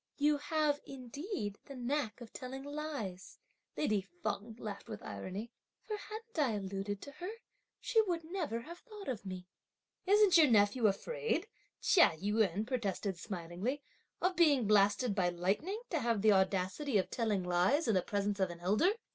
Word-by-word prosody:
"You 295 +1 +3
have, 300 -1 +1
indeed, 270 - -5
the 275 - -8
knack 255 -1 -2
of 230 - -10
telling 265 +1 -6
lies!" 285 -11 -5 0.4
lady 215 -9 +2
Feng 200 +4 -5
laughed 205 -3 -6
with - - -7
irony; 205 +6 -6 0.3
"for 430 - -3
hadn't 435 -1 -7
I 265 -7 +3
alluded 195 +1 -4
to 285 - -8
her, 360 +6 -6 0.5
she 450 - +3
would 340 -2 -1
never 320 - -3
have 340 +8 -10
thought 425 -5 -11
of 215 -6 -4
me!" 185 -1 -6 0.6
"Isn't 405 -3 +6
your 310 - +8
nephew 215 +1 +4
afraid," 455 - -1 0.4
Chia 340 - +6
Yün 205 +1 +1
protested 205 -6 -2
smilingly, 195 +9 -4 0.4
"of 365 0 +2
being 295 -9 +5
blasted 205 +2 +4
by 185 -3 +2
lightning 195 - -1
to 330 - +1
have 230 -5 0
the 215 - +7
audacity 195 +7 +2
of 185 - 0
telling 215 -5 0
lies 180 - +2
in 225 - +3
the 185 - +3
presence 205 +1 -1
of 190 -1 +2
an 170 0 -8
elder! 215 - +3
230 Hz, 165 wpm, -34 LUFS, 195-300 Hz, 0.6 s, your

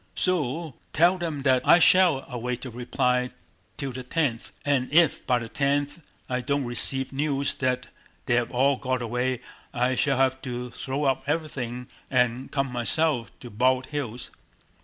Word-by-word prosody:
"So 165 -3 0 0.2
tell 175 +4 +4
them 160 -5 -3
that 130 -2 +4
I - - +7
shall 175 -5 +5
await 125 0 -4
a 125 - -6
reply 125 +1 0 0.5
till 140 -3 -3
the 130 +1 -6
tenth, 125 -3 -1
and 140 -3 +1
if 165 0 +4
by 125 - +3
the 115 -1 -5
tenth 140 +4 0 0.3
I 125 0 -1
don't 140 +1 -1
receive 135 +2 0
news 140 0 0
that 125 -1 0 0.4
they 120 - +1
have 120 -1 +2
all 135 +2 +2
got 130 -1 -2
away 125 +1 -1 0.3
I 125 +1 +2
shall 135 +1 +1
have 130 0 +2
to 125 -1 -5
throw 135 +4 -3
up 135 -1 +1
everything 130 -6 -3 0.2
and 125 0 +1
come 135 -2 -1
myself 125 +1 0
to 120 - -9
Bald 130 +4 +2
Hills." 125 -5 -4
130 Hz, 160 wpm, -26 LUFS, 125-145 Hz, 0.5 s, I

